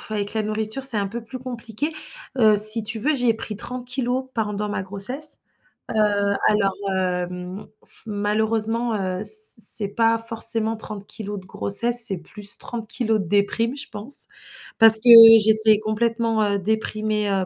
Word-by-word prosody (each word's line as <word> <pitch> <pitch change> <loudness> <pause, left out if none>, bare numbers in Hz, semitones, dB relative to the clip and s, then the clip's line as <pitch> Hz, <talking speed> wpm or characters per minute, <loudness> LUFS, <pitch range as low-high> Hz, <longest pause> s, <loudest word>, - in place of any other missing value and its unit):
avec 205 0 -5
la 220 - -2
nourriture, 215 +4 -4
c'est 240 -5 +2
un 200 -1 -2
peu 230 +4 -8
plus 255 +3 -10
compliqué. 245 +3 -7 0.5
Heu, 215 -3 +3
si 215 +2 +5
tu 225 +1 -2
veux, 300 +7 -1
j'ai 245 -4 0
pris 215 -2 -8
30 250 +2 -4
pendant 210 -2 -4
ma 205 - -5
grossesse. 205 +11 -9 0.6
Heu, - - -7 0.5
alors, 200 -2 0 0.2
hem, 180 +1 -5 0.2
f - - 0
malheureusement, 220 +2 -1
heu, 190 0 -5
c - - +4 0.3
c'est 205 0 +4
pas 225 +2 0
forcément 225 -1 +1
30 205 -1 -7
de 185 - -17
grossesse, 235 +5 +5
c'est 195 -3 -4
plus 200 +5 -3
30 225 -1 -4
de - - -7
déprime, 230 +6 -2
je - - -6
pense 220 +7 -3 0.6
parce 225 0 +9
que 235 +2 +2 0.3
j'étais 220 0 +2
complètement, 225 0 -2
heu, 200 -1 -1
déprimée, 215 0 -3
heu, 190 -1 -2
215 Hz, 155 wpm, -20 LUFS, 205-230 Hz, 0.6 s, parce